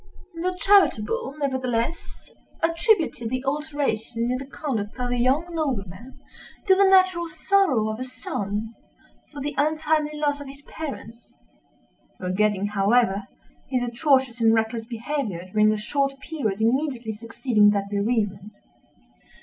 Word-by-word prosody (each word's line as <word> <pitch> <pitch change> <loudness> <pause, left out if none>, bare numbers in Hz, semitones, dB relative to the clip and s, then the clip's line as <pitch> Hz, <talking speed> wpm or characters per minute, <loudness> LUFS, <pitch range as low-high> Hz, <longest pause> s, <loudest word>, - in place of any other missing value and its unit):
The 360 +2 -2
charitable, 395 - +3
nevertheless, 260 +1 -2 0.4
attributed 330 - +1
the 255 +2 -3
alteration 270 -5 -1
in 255 - 0
the 270 - -8
conduct 245 -8 -4
of 250 0 -1
the 245 - 0
young 265 +7 +2
nobleman 245 - -4 0.5
to 385 - +6
the 390 0 +5
natural 370 -3 +4
sorrow 320 - +2
of 215 +1 -4
a - - -2
son 225 -4 -4 0.6
for 290 -2 -8
the 290 +2 -3
untimely 310 0 +1
loss 290 -1 0
of 285 - -8
his 275 +1 -11
parents—forgetting, 185 - -5
however, 205 0 +2 0.4
his 255 -2 0
atrocious 250 -1 +1
and 225 0 +5
reckless 225 0 -1
behavior 230 - -4
during 215 +1 +4
the 215 - +1
short 275 +5 -1
period 240 -10 -3
immediately 240 -1 0
succeeding 225 -1 +2
that 200 -1 0
bereavement. 205 -1 -1
245 Hz, 125 wpm, -24 LUFS, 215-295 Hz, 0.6 s, to